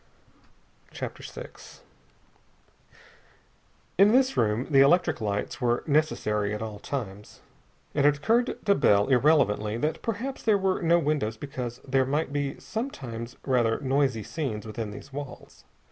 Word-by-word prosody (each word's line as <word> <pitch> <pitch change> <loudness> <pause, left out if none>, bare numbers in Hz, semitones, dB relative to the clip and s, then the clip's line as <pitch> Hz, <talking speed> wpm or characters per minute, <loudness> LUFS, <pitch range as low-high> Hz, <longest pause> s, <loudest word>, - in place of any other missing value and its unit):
CHAPTER - - -7
VI - - -8 2.5
In 200 +2 +7
this 260 +1 +3
room 110 +2 +1
the 135 - +5
electric 160 0 +4
lights 105 +4 -3
were 120 -1 +1
necessary 105 -9 +1
at 105 - -6
all 105 -2 -6
times. 105 -6 -6 0.5
And 145 -1 +3
it 145 -1 +3
occurred 235 - +1
to 200 - +5
Bell 100 - +3
irrelevantly 125 -6 +3
that 150 +6 -2
perhaps 235 +5 -4
there 215 -3 +3
were 190 -1 0
no 170 0 +4
windows 145 -9 -1
because 125 -2 -6
there 135 0 +2
might 145 +1 -1
be 140 -1 -2
sometimes 125 - -6
rather 120 -4 +2
noisy 135 -4 +1
scenes 115 -9 -4
within 110 0 -5
these 120 +6 -11
walls. 140 -2 -9
135 Hz, 135 wpm, -27 LUFS, 110-155 Hz, 2.5 s, In